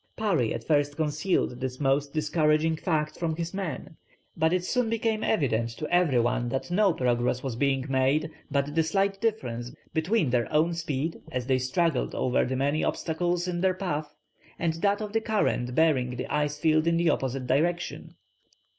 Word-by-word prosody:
Parry 170 - +1
at 115 - -4
first 145 0 +1
concealed 150 -3 0
this 130 -1 -4
most 140 0 +1
discouraging 155 +1 +2
fact 155 -2 -1
from 165 -2 -1
his 170 +2 -4
men; 185 -4 -5 0.4
but 160 0 +2
it 180 0 0
soon 250 0 0
became 225 -1 0
evident 115 - +1
to 135 +7 -6
every 170 -8 +4
one 120 +1 0
that 135 +7 -3
no 200 +1 +4
progress 125 -3 0
was 130 -4 -3
being 135 0 +1
made, 135 +4 +1 0.2
but 140 0 0
the 165 - +3
slight 195 +4 0
difference 120 - -2 0.2
between 160 - +1
their 120 -3 0
own 160 +3 +2
speed 160 -1 -3
as 125 -1 -2
they 130 0 +2
struggled 135 +3 0
over 130 - +1
the 130 - -2
many 140 +4 0
obstacles 175 +2 -1
in 175 -1 -2
their 185 -1 +2
path 155 -6 -3 0.4
and 165 -1 0
that 200 +5 0
of 210 -1 -5
the 225 - +2
current 200 - 0
bearing 130 -6 +2
the 125 - -4
ice 150 0 0
field 155 +1 +2
in 170 0 +3
the 170 -1 +3
opposite 135 -2 -2
direction. 170 +7 -1
155 Hz, 180 wpm, -27 LUFS, 130-175 Hz, 0.4 s, every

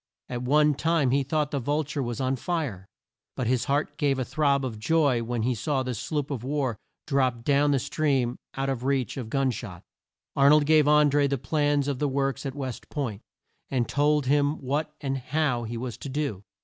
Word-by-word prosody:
At 120 -1 -3
one 150 +4 +4
time 160 -3 +1
he 140 +2 +3
thought 150 +2 -1
the 140 - -1
Vul 145 +5 0
ture 145 0 -4
was 120 -3 -3
on 130 0 0
fire; 130 - -3 0.5
but 130 - -2
his 125 0 +1
heart 145 +1 -1
gave 140 -2 +2
a 130 - -1
throb 140 0 +1
of 110 -4 -5
joy 140 -1 +2
when 115 -1 -2
he 125 +2 +1
saw 135 +3 -1
the 130 -1 -3
sloop 145 +6 -3
of 125 -5 -3
war 135 -3 -1 0.3
drop 130 -5 +1
down 145 +2 +3
the 140 - +3
stream 135 -3 0 0.2
out 135 0 -1
of 130 -3 -2
reach 135 -2 0
of 125 -5 -5
gun 135 +1 +1
shot. 100 -7 -8 0.5
Ar 140 0 +5
nold 150 0 +5
gave 155 -1 +5
An 150 -1 +5
dré 145 0 +3
the 140 - 0
plans 145 +2 +1
of 140 -3 -2
the 145 - +1
works 135 +1 -1
at 135 - -6
West 130 -4 -6
Point, 120 -8 -3 0.5
and 125 -3 0
told 145 0 +2
him 145 +2 +2
what 145 +4 -2
and 135 -2 -2
how 130 -2 0
he 115 +1 -5
was 120 0 -5
to 140 - -6
do. 135 -8 -2
135 Hz, 215 wpm, -26 LUFS, 125-145 Hz, 0.5 s, Ar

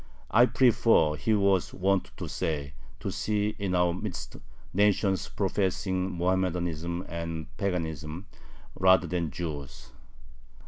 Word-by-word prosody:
"I 120 +2 +6
prefer," 115 - +4
he 110 +8 +1
was 100 -3 +2
wont 95 0 +1
to - - -5
say, 70 -3 -3 0.3
"to - - -3
see 105 -1 0
in 95 -2 -1
our 90 -1 +3
midst 95 +1 -5 0.4
nations 100 0 +2
professing 95 -1 -1
Mohammedanism 90 -1 -1
and 85 -2 -5
paganism 80 -3 -3 0.5
rather 95 -2 +4
than 85 -1 -1
Jews. 75 -5 -6
90 Hz, 110 wpm, -28 LUFS, 85-100 Hz, 0.5 s, I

